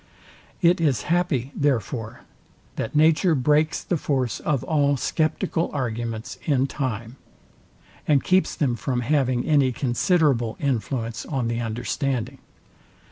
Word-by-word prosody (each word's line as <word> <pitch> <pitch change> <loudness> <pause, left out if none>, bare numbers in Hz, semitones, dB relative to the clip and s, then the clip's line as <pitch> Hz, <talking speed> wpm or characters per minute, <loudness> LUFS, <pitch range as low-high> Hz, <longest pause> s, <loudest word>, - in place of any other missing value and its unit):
It 170 0 +4
is 140 -8 +1
happy, 155 -8 0
therefore, 115 -5 -1 0.5
that 115 - -4
nature 160 +3 +4
breaks 150 +4 +2
the 175 - -1
force 130 -5 -1
of 145 -4 -1
all 145 -3 +2
sceptical 165 +4 -1
arguments 115 -4 -4
in 135 -3 +2
time, 125 -3 -4 0.9
and 145 -3 +3
keeps 185 +1 +2
them 130 -5 0
from 125 +1 -2
having 130 -2 +1
any 140 -4 +3
considerable 125 - +1
influence 120 -4 -2
on 130 -5 -1
the 115 0 -1
understanding. 125 +3 -2
135 Hz, 120 wpm, -24 LUFS, 120-150 Hz, 0.9 s, It